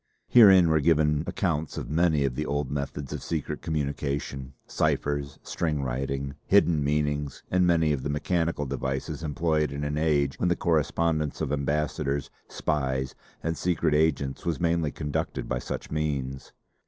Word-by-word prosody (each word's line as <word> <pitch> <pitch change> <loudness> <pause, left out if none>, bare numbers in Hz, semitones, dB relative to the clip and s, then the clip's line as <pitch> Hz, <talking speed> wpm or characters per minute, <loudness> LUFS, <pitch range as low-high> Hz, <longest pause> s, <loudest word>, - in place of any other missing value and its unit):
Herein 95 -7 +8
were 80 0 +4
given 75 -1 +3
accounts 80 -5 -1
of - - -4
many 80 -3 +3
of 65 - -1
the 75 +4 -3
old 70 -2 -1
methods 70 -1 -4
of - - -5
secret 80 -3 -3
communication, 70 -3 -3
ciphers, 70 -1 -1
string 75 -4 -1
writing, 70 +2 -2
hidden 85 -7 +4
meanings, 75 -1 -1
and 90 -1 +3
many 80 -3 +3
of 70 - -2
the 70 - -3
mechanical 80 +1 0
devices 65 +2 -3
employed 75 -1 0
in 70 +1 -4
an 75 +1 -1
age 70 -3 +1
when 90 - +2
the 90 - +2
correspondence 80 -2 0
of - - -2
ambassadors, 70 -1 -1 0.2
spies 65 -3 -1 0.3
and 80 +1 -1
secret 85 -2 0
agents 75 -3 +1
was 85 -2 -1
mainly 85 -2 +1
conducted 75 0 -3
by - - -1
such - - -6
means. 70 -4 -2
75 Hz, 155 wpm, -27 LUFS, 70-80 Hz, 0.3 s, Herein